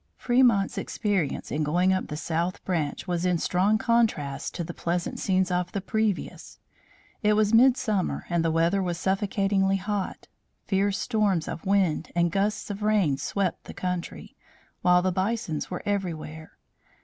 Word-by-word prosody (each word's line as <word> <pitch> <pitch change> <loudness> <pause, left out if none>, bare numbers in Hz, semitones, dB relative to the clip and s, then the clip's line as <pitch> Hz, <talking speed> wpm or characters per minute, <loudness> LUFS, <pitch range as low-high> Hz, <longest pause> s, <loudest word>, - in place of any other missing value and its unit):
Fremont's 240 -6 +3
experience 195 -9 -2
in 150 - -1
going 175 +5 +2
up 185 - -1
the 150 - -5
south 170 +4 -2
branch 165 -2 -2
was 175 -1 -1
in 180 -1 +2
strong 185 +6 +2
contrast 215 -13 0
to 175 - -2
the 170 +1 -6
pleasant 170 +1 -2
scenes 190 -1 +1
of 180 0 -1
the 200 - -1
previous. 215 0 -2 0.6
It 210 0 +3
was 210 0 +2
midsummer 225 -5 +3
and 170 -1 0
the 165 - +2
weather 165 +4 +2
was 175 -2 -2
suffocatingly 195 0 +1
hot. 200 0 -4 0.4
Fierce 195 0 +1
storms 205 -8 0
of 170 - -6
wind 190 -5 +1
and 170 -1 +2
gusts 205 +3 -1
of 200 +1 -6
rain 205 -10 +2
swept 190 +4 -2
the - - -9
country, 180 -1 -4 0.5
while 180 0 +4
the 185 - +1
bisons 190 -3 -2
were 180 - -5
everywhere. 160 -6 -4
185 Hz, 155 wpm, -26 LUFS, 170-205 Hz, 0.6 s, while